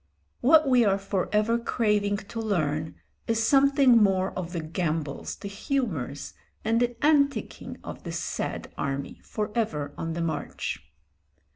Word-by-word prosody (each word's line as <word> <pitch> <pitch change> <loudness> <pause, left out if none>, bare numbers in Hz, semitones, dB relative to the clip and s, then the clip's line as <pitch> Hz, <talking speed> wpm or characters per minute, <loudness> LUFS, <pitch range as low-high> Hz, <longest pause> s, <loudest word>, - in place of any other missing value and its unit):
What 305 +3 +6
we 250 -2 +5
are 195 -2 +3
for 195 -1 -2
ever 215 +3 +2
craving 210 -3 +1
to 205 +3 -7
learn 155 -7 -1 0.3
is 225 0 +1
something 275 -3 +5
more 190 -2 +3
of 180 -2 -5
the 175 - -2
gambols, 155 -2 -3
the - - -8
humours, 200 - -3 0.3
and 225 +1 +3
the 245 +3 0
anticing 280 -2 +1
of - - -7
this - - -4
sad - - -4
army, 140 0 -3
for 210 -1 -3
ever 150 -11 -1
on 165 0 -2
the 170 - -3
march. 160 -3 -3
205 Hz, 145 wpm, -27 LUFS, 165-235 Hz, 0.3 s, What